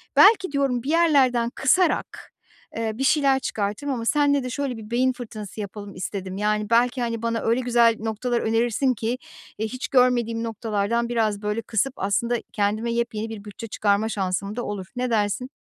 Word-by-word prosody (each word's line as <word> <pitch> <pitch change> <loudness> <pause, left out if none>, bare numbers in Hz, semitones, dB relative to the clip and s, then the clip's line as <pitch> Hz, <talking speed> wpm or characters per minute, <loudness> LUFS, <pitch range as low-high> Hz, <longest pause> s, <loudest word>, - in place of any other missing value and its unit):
belki 395 -6 +6
diyorum 270 -4 0
bir 280 - -4
yerlerden 275 -8 +3
kısarak, 335 +7 +1 0.5
eee, 225 -1 -1
bir 270 - -1
şeyler 275 -2 +3
çıkartırım 215 +6 -2
ama 230 -2 -4
senle 285 0 +3
de 255 - -4
şöyle 260 -2 -3
bir 220 +1 -10
beyin 255 +2 +2
fırtınası 215 -4 -7
yapalım 205 0 -8
istedim. 190 0 -5
Yani, 210 +1 0
belki, 245 +2 +3
hani, 230 -1 -2
bana 230 -1 -1
öyle 230 +3 +1
güzel 235 -2 +4
noktalar 225 +2 -1
önerirsin 235 +3 +1
ki, 225 0 -3 0.5
eee, 220 +1 -1
hiç 255 +2 -5
görmediğim 240 -3 +2
noktalardan 225 +1 -1
biraz, 220 -3 0
böyle, 210 +2 -2
kısıp 225 +4 -1
aslında 235 +5 0 0.2
kendime 215 +3 0
yepyeni 225 -2 -2
bir 210 -2 -7
bütçe 215 +2 -8
çıkarma 210 +1 +1
şansım 200 +1 -2
da 240 - -3
olur. 195 -3 -5
Ne 250 0 -1
dersin? 225 +3 0
230 Hz, 175 wpm, -24 LUFS, 210-250 Hz, 0.5 s, belki